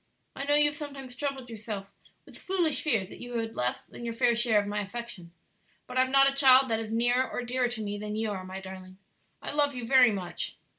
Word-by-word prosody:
I 275 - -4
know 290 +1 +3
you 295 0 +5
have 295 0 0
sometimes 275 -4 -8
troubled 270 -1 -4
yourself 215 -3 -7 0.3
with - - -15
foolish 350 -5 +1
fears 225 - 0
that - - -12
you 245 0 -7
had 225 -1 -3
less 125 0 -1
than - - -11
your 230 -1 -4
fair 235 0 +3
share 230 -2 +4
of 205 - -2
my 205 +1 -2
affection; 200 -4 -8 0.5
but 250 - -9
I - - +2
have 260 0 +3
not 275 +1 +6
a 275 - +1
child 265 -2 +6
that 225 - +1
is 220 -1 -5
nearer 245 +3 +2
or 245 - -4
dearer 250 +1 0
to 240 -2 -4
me 205 0 -4
than 210 0 -5
you 220 0 -1
are, 190 -2 -5
my 185 +1 -7
darling. 185 0 -10 0.5
I - - -3
love 290 -1 +1
you 245 -2 -4
very 250 -1 +6
much." 185 -4 -5
235 Hz, 245 wpm, -28 LUFS, 210-265 Hz, 0.5 s, not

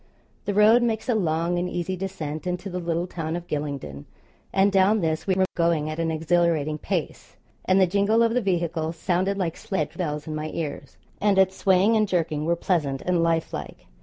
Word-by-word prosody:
The 205 -1 -2
road 215 +3 +6
makes 225 -2 -1
a - - +4
long 170 -3 0
and 180 +1 -2
easy 175 +2 -3
descent 170 -4 -5
into 180 +2 -3
the 180 - -3
little 170 0 -1
town 165 -2 -4
of 175 0 -5
Gylingden, 140 - -5 0.5
and 195 +1 +3
down 195 +2 +3
this 160 +1 -1
we 190 - +2
were 190 0 +3
going 165 -3 +1
at 155 - -6
an 165 0 0
exhilarating 160 -2 +1
pace, - - -4 0.3
and 185 +1 +4
the 190 - +6
jingle 200 +5 +2
of 230 0 +2
the 250 - +2
vehicle 170 -4 -1
sounded 185 +3 0
like 170 -4 -1
sledge 195 - -3
bells 150 -5 -3
in 155 - -5
my 155 0 -3
ears, 145 -4 -5 0.2
and 200 -1 +3
its 190 0 +4
swaying 195 +4 +3
and 215 -1 +3
jerking 155 -5 -1
were 170 +1 +2
pleasant 150 -7 -1
and 180 -2 +1
life 165 -1 0
like. - - -7
175 Hz, 200 wpm, -25 LUFS, 160-195 Hz, 0.5 s, road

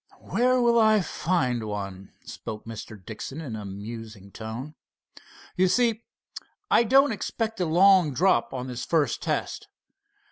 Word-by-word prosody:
"Where 255 +2 +1
will 235 -1 +4
I 215 -2 +5
find 150 -10 -1
one?" 100 -2 -6
spoke 105 -1 -8
Mr. 110 -1 -8
Dixon 115 +6 -7
in 135 -9 -6
a 105 -1 -6
musing 105 0 -8
tone. 115 +8 -7 0.8
"You 185 +1 +3
see, 230 +2 +1 0.7
I 235 - +6
don't 270 +3 +4
expect 225 0 -3
a - - +2
long 180 -1 +5
drop 155 -2 +2
on 125 -1 -4
the 125 -2 -7
first 150 +4 0
test. - - -3
145 Hz, 140 wpm, -26 LUFS, -, 0.8 s, I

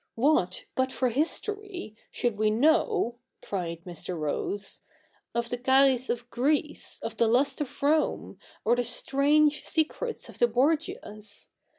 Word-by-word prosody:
What, 225 - +2
but 260 0 0
for 255 -1 +1
history, 355 - -2
should 240 -3 -1
we 215 +1 +2
know,' 270 - +2 0.2
cried 170 -4 -4
Mr. 180 0 -6
Rose, 160 +6 -3 0.3
' - - -39
of 235 0 -1
the 245 - -3
Xapts 265 0 +4
of 240 0 -2
Greece, 295 +4 -1
of - - -4
the 230 - +3
lust 260 +6 +2
of 285 0 -6
Rome, 305 +2 +1 0.3
of 235 +3 +3
the 245 - +2
strange 290 +5 +2
secrets 390 +9 -1
of - - -12
the 240 - +5
Borgias 260 - -2
255 Hz, 145 wpm, -28 LUFS, 220-300 Hz, 0.3 s, the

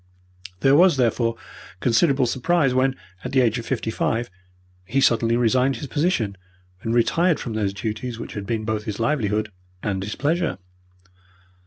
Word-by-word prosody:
There 135 +1 +5
was, 175 -1 +5
therefore, 115 -2 +1 0.4
considerable 135 - +3
surprise 135 +3 +1
when, 130 +1 +2 0.3
at 125 - -5
the 135 - +4
age 120 -1 +1
of 115 - -8
fifty 120 -4 -2
five, 115 -1 -1 0.5
he 130 +9 -1
suddenly 115 -3 +3
resigned 125 +3 +2
his - - -6
position 130 - 0 0.4
and 115 - -2
retired 165 +7 +2
from 115 - -5
those 105 -3 0
duties 110 +3 -4
which 115 - -7
had 100 -2 -6
been 110 -1 -2
both 110 -1 -2
his 105 -1 -4
livelihood 110 -4 0 0.3
and 95 -3 -1
his 105 +2 -4
pleasure. 160 - 0
120 Hz, 160 wpm, -23 LUFS, 110-135 Hz, 0.5 s, There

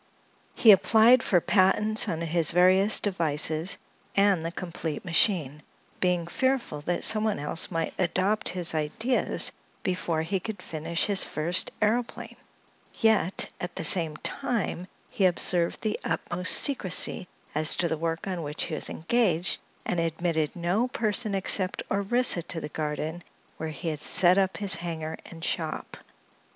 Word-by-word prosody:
He 225 - +7
applied 225 +5 +6
for 180 - +2
patents 210 +4 +2
on 165 - -3
his 165 -1 +1
various 185 +4 +4
devices 160 -2 -1 0.4
and 200 -4 +3
the 165 - -3
complete 170 -4 -5
machine, 160 -4 +2 0.4
being 180 -2 +1
fearful 255 - -1
that 175 - -1
someone 215 -1 +1
else 150 +3 -2
might 165 -2 -2
adopt 190 +4 +1
his 175 -3 -1
ideas 160 - 0 0.3
before 170 -3 -1
he 190 +4 -1
could 220 -1 -6
finish 165 0 -2
his 200 -2 +2
first 170 +4 +1
aëroplane; 230 +3 -1 0.6
yet 220 -5 +3
at 180 - -5
the - - -4
same 160 -4 +2
time 190 -5 -2 0.2
he 195 - 0
observed 175 -1 +1
the 215 -1 -1
utmost 180 +1 -1
secrecy 190 - +1 0.3
as 155 +1 +3
to 175 - +1
the 160 - -1
work 165 +1 -3
on 185 -3 -3
which 150 0 -3
he - - -5
was 155 - 0
engaged 180 -1 +1 0.3
and 175 - -1
admitted 165 -1 -1
no 180 +8 0
person 215 -3 -1
except 190 0 -1
Orissa 200 0 +1
to 170 0 -3
the 150 - -6
garden, 155 +3 -4 0.3
where 160 - -4
he 155 +2 -5
had 155 -2 -4
set 180 +4 +4
up 190 -1 0
his 200 -2 -2
hangar 165 -1 -5
and 165 -1 -8
shop. 160 -2 -3
180 Hz, 145 wpm, -27 LUFS, 160-200 Hz, 0.6 s, He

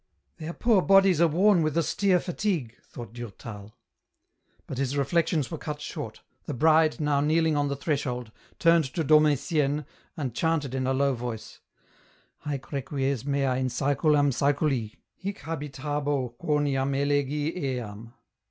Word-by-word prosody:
" - - -48
Their 160 +1 -5
poor 225 -2 +3
bodies 195 -3 +5
are 170 - +6
worn 180 +3 +4
with 155 0 0
austere 180 +3 +2
fatigue," 175 - -2
thought 115 -3 -10
Durtal. 110 -3 -9 0.9
But 130 - -6
his 140 +1 -1
reflections 155 +1 +1
were 160 - -4
cut 150 -1 -5
short, - - -6 0.2
the - - -4
bride, 160 +3 +4
now 145 -2 +1
kneeling 160 +1 +2
on 145 0 +1
the 140 - -2
threshold, 130 -5 -2 0.3
turned 165 -2 +4
to 165 - 0
Dom 155 +1 +6
Etienne 150 0 0 0.3
and 135 -6 -3
chanted 155 -2 0
in 130 -1 -1
a 135 - +2
low 140 0 +2
voice, 120 -2 -6 0.3
— - - -32
" - - -38
Haec 140 -2 -4
requies 135 -2 -2
mea 135 -2 +1
in 130 - 0
saeculum 145 +2 +2
saeculi: 140 -4 0 0.3
Hie 200 +1 -2
habitabo 145 - -3
quoniam 140 -1 0
elegi 145 +2 0
eam." 120 - -5
145 Hz, 150 wpm, -27 LUFS, 130-160 Hz, 0.9 s, are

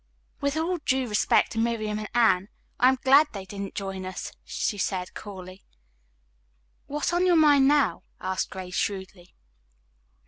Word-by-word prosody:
"With 280 +2 -1
all 340 +2 -1
due 260 -3 0
respect 210 -1 +2
to 225 - -3
Miriam 220 -2 -1
and 215 - -6
Anne, 210 -5 +3 0.3
I 250 - +6
am 265 - +1
glad 280 +3 +6
they 195 -2 -6
didn't 200 0 -7
join 195 -1 -4
us," 185 0 -6
she 205 - -3
said 185 -1 -2
coolly. 185 -2 -10 1.2
"What 295 +1 -3
is - - 0
on 360 +1 +2
your 355 - +5
mind 290 -4 +5
now?" 285 - +2 0.2
asked 185 0 -2
Grace 185 -1 -8
shrewdly. 190 -2 -4
215 Hz, 160 wpm, -26 LUFS, 190-280 Hz, 1.2 s, I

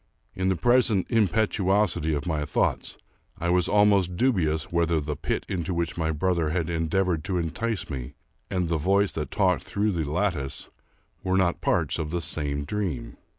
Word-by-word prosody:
In 95 0 -1
the 95 - +2
present 120 -1 +3
impetuosity 100 -6 +2
of 70 - -3
my 80 -3 -1
thoughts, - - -1 0.4
I 85 +1 -1
was 90 -1 +3
almost 100 -4 +3
dubious 85 - +1
whether 85 -1 +2
the 75 0 -3
pit - - -3
into 90 -1 -2
which 85 -1 -1
my 80 -2 -1
brother 85 0 0
had 85 0 -1
en 80 -1 -1
deavored 90 -3 +1
to 95 - -1
entice 95 +6 -2
me, 65 -2 -6 0.3
and 90 -2 -1
the 85 0 0
voice 100 +5 +2
that 75 -1 -4
talked 95 -3 +2
through 105 +1 -1
the 80 -5 -2
lattice, 80 -6 -2 0.5
were 95 0 +1
not 90 -2 +1
parts - - 0
of 75 - -3
the 85 +2 -1
same 75 -3 -1
dream. 95 -7 -3
85 Hz, 175 wpm, -26 LUFS, 80-95 Hz, 0.5 s, present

